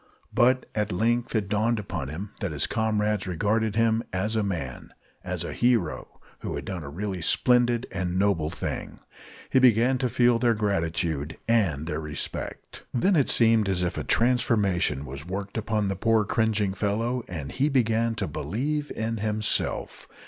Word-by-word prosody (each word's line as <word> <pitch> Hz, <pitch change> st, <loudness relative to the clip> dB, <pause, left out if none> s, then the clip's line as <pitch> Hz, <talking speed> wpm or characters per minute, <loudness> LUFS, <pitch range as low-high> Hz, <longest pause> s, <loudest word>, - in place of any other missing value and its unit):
But 130 Hz, +1 st, +3 dB
at 105 Hz, -1 st, -1 dB
length 120 Hz, +5 st, 0 dB
it 105 Hz, -3 st, 0 dB
dawned 110 Hz, +3 st, +1 dB
upon 90 Hz, -9 st, -4 dB
him 95 Hz, +9 st, -6 dB
that 100 Hz, -6 st, -2 dB
his 75 Hz, -1 st, +1 dB
comrades 105 Hz, -3 st, 0 dB
regarded 105 Hz, +4 st, 0 dB
him 115 Hz, 0 st, +3 dB
as 105 Hz, +4 st, -1 dB
a 110 Hz, -, +2 dB
man, 85 Hz, -11 st, -4 dB, 0.3 s
as -, -, -2 dB
a -, -, -5 dB
hero, 120 Hz, -9 st, 0 dB, 0.2 s
who -, -, -4 dB
had -, -, -5 dB
done 95 Hz, -3 st, -4 dB
a 70 Hz, -, -7 dB
really 95 Hz, +3 st, -4 dB
splendid 120 Hz, +6 st, +3 dB
and 90 Hz, -1 st, -2 dB
noble 95 Hz, -6 st, +1 dB
thing. -, -, -5 dB, 0.5 s
He 130 Hz, -, +5 dB
began 125 Hz, +1 st, +4 dB
to 125 Hz, -1 st, 0 dB
feel 120 Hz, 0 st, +3 dB
their 120 Hz, -1 st, +3 dB
gratitude 85 Hz, -7 st, -1 dB
and 95 Hz, -11 st, +2 dB
their 80 Hz, -2 st, -3 dB
respect. 75 Hz, -1 st, -5 dB
Then 185 Hz, +11 st, +2 dB
it 140 Hz, -5 st, +3 dB
seemed 115 Hz, -3 st, +4 dB
as 90 Hz, -2 st, 0 dB
if 90 Hz, -, -1 dB
a -, -, -3 dB
transformation 105 Hz, -, +1 dB
was 70 Hz, +1 st, -7 dB
worked 100 Hz, +4 st, -5 dB
upon 110 Hz, -2 st, 0 dB
the 95 Hz, -, -1 dB
poor 110 Hz, +2 st, +2 dB
cringing 110 Hz, -3 st, +1 dB
fellow, 115 Hz, +5 st, -1 dB
and 80 Hz, -6 st, -6 dB
he 140 Hz, +3 st, +1 dB
began 115 Hz, -3 st, +1 dB
to 105 Hz, -3 st, -2 dB
believe 135 Hz, -, -2 dB
in 115 Hz, +1 st, -2 dB
himself. 105 Hz, 0 st, -1 dB
105 Hz, 170 wpm, -26 LUFS, 90-115 Hz, 0.5 s, He